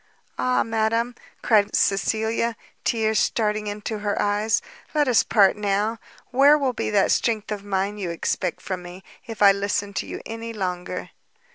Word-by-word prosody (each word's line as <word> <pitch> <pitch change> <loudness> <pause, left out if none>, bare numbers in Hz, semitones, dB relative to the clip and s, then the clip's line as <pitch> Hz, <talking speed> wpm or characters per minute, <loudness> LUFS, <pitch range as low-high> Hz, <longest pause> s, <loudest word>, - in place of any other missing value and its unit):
"Ah, 255 0 +2
madam," 225 +2 0 0.3
cried 210 -2 +3
Cecilia, 220 +3 +1 0.3
tears 220 -2 +1
starting 210 -1 0
into 210 +1 -4
her 205 -1 -2
eyes, 210 +2 +1 0.4
"let 295 -2 +3
us 245 -3 +5
part 200 -4 +4
now! 210 +2 -1 0.3
where 280 +4 +6
will 270 -3 0
be - - -2
that 205 -2 +3
strength 220 -2 0
of 205 -2 -4
mind 200 +1 -2
you 185 -3 -3
expect 170 +1 -2
from 185 -2 -4
me, 180 +2 -10 0.2
if 225 -2 -2
I 200 - +9
listen 200 0 -2
to - - -3
you - - -6
any 230 +1 -6
longer!" 180 -4 -4
210 Hz, 160 wpm, -24 LUFS, 200-225 Hz, 0.4 s, I